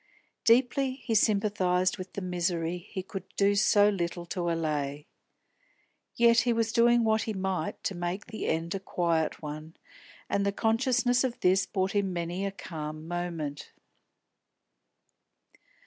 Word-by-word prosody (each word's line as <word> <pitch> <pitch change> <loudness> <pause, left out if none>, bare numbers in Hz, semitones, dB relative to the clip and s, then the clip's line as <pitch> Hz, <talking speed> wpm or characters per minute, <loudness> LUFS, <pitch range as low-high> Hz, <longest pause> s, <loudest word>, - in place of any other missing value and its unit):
Deeply 255 +3 +3
he 260 -3 -4
sympathised 200 -4 +2
with 185 0 -8
the 200 - -4
misery 175 -1 -1
he 185 +2 -7
could 195 0 -6 0.2
do 200 0 +4
so 205 0 +5
little 175 -3 -2
to 175 0 -2
allay. 150 -3 -2 1.1
Yet 235 0 +5
he 240 +1 +2
was 225 -1 0
doing 235 0 +4
what 220 0 +2
he - - -1
might 190 -4 -3
to - - -1
make 175 +3 -3
the 220 -1 -5
end 165 +2 -1
a 195 - -2
quiet 170 -5 -1
one, 155 +2 -7 0.5
and 200 - 0
the 200 - +1
consciousness 245 +4 +2
of 250 -2 -2
this 190 +2 +3
brought 190 -1 -1
him 195 -2 0
many 175 +3 -2
a - - -3
calm 155 -4 -7
moment. 170 -4 -4
190 Hz, 145 wpm, -29 LUFS, 170-220 Hz, 1.1 s, so